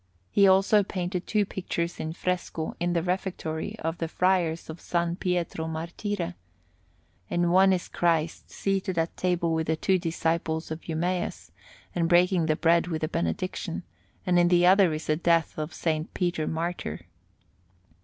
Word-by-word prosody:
He 200 -1 +5
also 195 +2 +5
painted 180 -2 -3
two 210 -2 +2
pictures 175 -3 -3
in 160 0 -3
fresco 180 -3 -3
in 175 0 0
the 170 -2 +1
Refectory 180 -3 -3
of 165 +1 -3
the 165 - -1
Friars 175 -2 +1
of 160 +1 -8
S. 170 -1 -1
Pietro 175 -3 -1
Martire: 170 +3 -3 1.0
in 175 0 +1
one 190 +2 +6
is 185 -2 0
Christ 165 -2 0
seated 195 -2 -1
at 165 0 0
table 175 -2 0
with 160 -1 -1
the 160 - +2
two 185 +3 +1
disciples 165 -1 -1
at 160 +2 -7
Emmaus, 175 +3 -2 0.4
and 170 -1 0
breaking 175 -1 +4
the 155 - +2
bread 170 +2 +3
with 160 -2 -3
a - - +2
benediction, 85 - -3 0.4
and 180 -1 +3
in 175 - +5
the 175 0 +4
other 190 -1 +6
is 155 +1 -4
the 155 - +2
death 170 -1 +2
of 155 0 -2
S. 155 -2 0
Peter 175 -4 0
Martyr. 160 - -3
170 Hz, 160 wpm, -27 LUFS, 160-180 Hz, 1.0 s, one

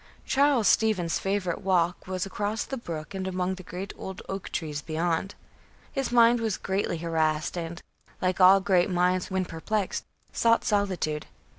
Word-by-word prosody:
Charles 275 -6 +3
Stevens' 200 -7 +2
favorite 195 -3 -1
walk 180 -2 +1
was 185 0 -2
across 205 +3 -2
the 270 - -5
brook 165 -9 -6
and 190 -1 -3
among 185 0 -1
the 185 - -8
great 185 +2 -6
old 190 -1 -7
oak 195 -1 -5
trees 150 -3 -3
beyond. 165 +4 -1 0.6
His 270 -3 -2
mind 235 0 +6
was 220 -4 -1
greatly 190 -2 -1
harassed 160 -1 0
and, 170 0 -4 0.4
like 185 0 0
all 190 +2 +8
great 185 -2 +3
minds 180 0 +1
when 190 -1 0
perplexed, 185 +5 -2 0.3
sought 230 0 +3
solitude. 185 -7 0
185 Hz, 155 wpm, -27 LUFS, 175-205 Hz, 0.6 s, all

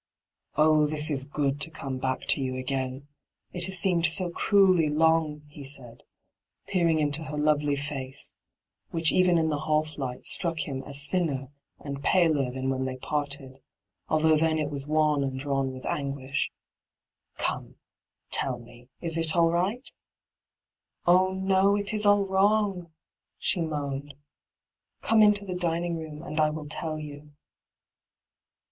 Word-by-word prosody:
' - - -62
Oh, 155 0 +4
this 150 0 0
is 135 -2 +1
good, 140 0 -2
to 160 - +2
oome 135 -5 -6
back 130 -1 -1
to - - +5
you 130 -1 -2
^ain 130 +1 -3 0.5
I - - -6
it 175 0 +2
baa - - -4
seemed 180 -2 +2
bo 180 -2 -2
cmeUy 185 -4 +3
long,' 155 -1 +2
he 145 -1 -11
said, 135 -4 -7 0.7
peering 170 -4 +2
into 145 +1 +1
her 150 -1 -5
lovely 150 -1 +2
faoe, 140 -2 -3 0.6
which 165 -1 +2
even 180 -1 +3
in 160 -1 +1
the 150 -1 -1
half 155 0 -1
light 125 -2 -5
struck 165 -2 +2
him 135 -2 -4
as 140 0 0
thinner 145 -6 -2 0.3
and 140 -1 -6
paler 155 -8 +2
than 130 +1 -3
when 130 0 -2
they 130 0 -4
parted, 140 -1 -2 0.5
although 155 0 +4
then 160 0 +1
it 150 -1 -2
was 140 -1 -1
wan 150 -2 +2
and 135 -1 -3
drawn 135 -1 -1
with 130 0 -10
anguish, 140 -2 -2 0.4
* - - -47
Gome, - - -3 0.6
tell 130 -2 +2
me, 120 +1 -16
is 165 -1 +3
it 160 -1 +1
aU 165 -1 +4
right 195 +9 -1 0.6
?' - - -51
'Oh 185 +2 +4
no; 190 +1 +2
it 205 +1 -1
is 210 -1 +2
all 205 -1 +4
wrong,' 195 -2 +1 0.5
she 175 - 0
moaned. 145 -3 -4 0.4
' - - -56
Come 225 -1 +4
into 210 -1 +4
the 185 - -4
dining 170 -1 -1
room, 155 -1 -8
and 155 -2 -4
I 155 0 +4
will 150 -1 -6
tell 155 +1 -4
you.' 150 -1 -10
155 Hz, 165 wpm, -27 LUFS, 140-170 Hz, 0.7 s, to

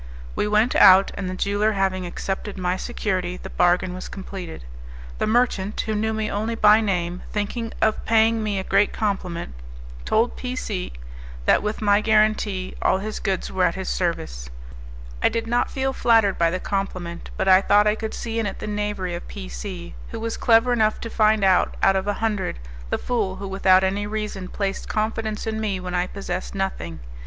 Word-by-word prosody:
We - - 0
went 215 +4 +2
out, 190 +1 +7
and 190 -2 -4
the 185 - -4
jeweller 205 +3 +1
having 190 -2 0
accepted 195 +3 -4
my 180 -1 0
security 185 -4 -2
the - - -9
bargain 180 +1 +2
was 185 - -7
completed. 185 - -8 0.5
The - - +1
merchant, 215 -3 +1
who 220 - -3
knew 220 +1 0
me 220 -1 -2
only 220 +3 -2
by 215 0 +6
name, 180 -4 -1
thinking 225 +2 -3
of 220 0 +1
paying 225 0 +3
me 210 -2 -1
a 190 - -2
great 205 - +2
compliment, 185 - -2 0.5
told 225 - +1
P 250 0 -4
C 200 -7 -4 0.5
that - - +4
with 210 +1 -3
my 205 0 +4
guarantee 215 -3 +1
all - - +3
his 215 +2 -5
goods 190 -3 -2
were - - 0
at - - +1
his - - -4
service. - - -2 0.7
I - - +4
did 230 0 -2
not 240 +1 +1
feel 265 0 -1
flattered 225 -6 +3
by 170 -1 +4
the 185 +2 -2
compliment, 185 -4 -4
but - - -1
I 190 0 +7
thought 205 +1 +4
I 210 - +4
could 220 0 -5
see 230 -1 -3
in 220 - 0
it 195 - -5
the - - -6
knavery 205 -3 -2
of 170 - -6
P 60 - -7
C, - - -7 0.2
who - - -6
was 230 0 -3
clever 235 +1 +4
enough 215 -2 +2
to 230 - -6
find 215 -1 +3
out, 190 -2 +3
out 195 - +5
of 190 +1 -1
a 205 - +1
hundred, 210 - -2 0.3
the - - 0
fool 215 -7 -1
who 195 - -6
without 190 -1 +4
any 200 +2 0
reason 210 -3 -4
placed 195 0 -3
confidence 220 0 -2
in 220 0 -2
me 200 -3 -1
when 180 0 -6
I 180 0 +1
possessed 185 -1 -5
nothing. 85 - -3
205 Hz, 195 wpm, -23 LUFS, 185-220 Hz, 0.7 s, out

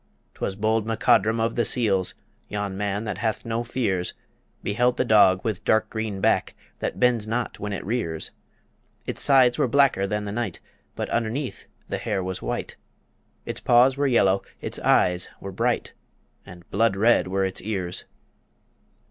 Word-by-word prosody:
'Twas 95 - -3
bold 110 +1 0
MacCodrum 115 0 +3
of 115 +1 0
the 120 - +1
Seals 100 -8 0 0.3
Yon 105 -2 -3
man 100 +1 -2
that 105 -4 -4
hath 110 0 -2
no 115 +1 -1
fears 105 -7 -1 0.5
Beheld 125 +5 +1
the - - +1
dog 100 -5 +5
with 110 -5 -2
dark 110 0 +2
green 110 -3 -3
back - - +1 0.2
That - - -3
bends 120 -4 +2
not 120 +2 -2
when 105 0 -4
it 100 - -4
rears; 95 -8 -2 0.7
Its - - -4
sides 130 -3 +5
were - - +3
blacker 135 -6 +3
than 105 +1 -2
the 100 - -4
night, 110 -5 -3 0.4
But - - -3
underneath 120 +4 -2 0.2
the - - -3
hair 95 - -2
was 95 0 -4
white; - - -4 0.7
Its - - -4
paws 125 +2 +5
were 140 0 +1
yellow, 100 -6 +3 0.2
its - - -4
eyes 90 0 +2
were 100 - -7
bright, 115 +5 -1 0.5
And 85 -1 -13
blood 100 0 +2
red 110 0 +3
were 95 +1 0
its 95 - -3
ears. 95 -4 -4
110 Hz, 165 wpm, -24 LUFS, 95-120 Hz, 0.7 s, dog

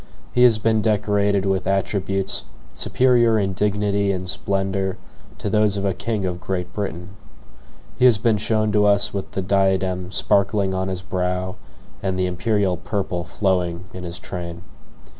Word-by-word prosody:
He 125 - +2
has 120 -3 +7
been 110 0 +2
decorated 105 -2 +1
with 95 -1 0
attributes 95 0 0 0.3
superior 120 - +3
in 95 -2 0
dignity 100 0 +1
and 95 -1 -3
splendor 95 0 -1 0.4
to - - -4
those 105 -1 +2
of 100 - -2
a 95 - +1
king 105 +2 -2
of 90 -1 -3
Great 90 -2 -3
Britain. 90 -3 -4 0.9
He 125 - +5
has 120 -4 +6
been 110 0 +2
shown 110 0 0
to 105 0 +3
us 100 0 +3
with 100 -1 -5
the 95 - -2
diadem 95 -1 +1
sparkling 100 -1 +2
on 95 0 -1
his 95 -1 -4
brow 90 0 -2 0.5
and 95 -1 -1
the 95 - +1
imperial 95 +1 0
purple 90 -1 -3
flowing 90 -3 -1
in 90 - -7
his 85 0 -6
train. 85 -1 -7
95 Hz, 160 wpm, -22 LUFS, 95-105 Hz, 0.9 s, has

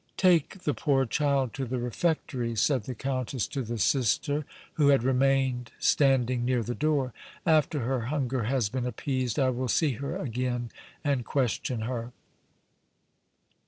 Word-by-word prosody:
"Take 180 0 +3
the 150 - +1
poor 135 +2 +2
child 140 -2 +1
to 135 - -3
the 125 +1 -3
refectory," 125 -1 -1
said 125 +1 +1
the 130 - -5
Countess 130 -1 -2
to 140 - -3
the 120 -1 -4
Sister, 140 +5 +1 0.3
who 150 -3 +3
had 140 -4 +5
remained 130 -2 +1
standing 130 -3 +3
near 125 -1 +1
the 120 - -3
door. 140 -3 0 0.3
"After 155 -3 +3
her 120 -1 -1
hunger 130 -4 -1
has 125 -2 +1
been 125 +3 -2
appeased, 130 -2 -2
I 130 -2 +3
will 130 +1 -2
see 150 +4 +2
her 140 - -3
again 125 -1 -2 0.3
and 140 -4 +1
question 125 -2 -1
her." 120 +1 -4
130 Hz, 150 wpm, -28 LUFS, 120-140 Hz, 0.3 s, had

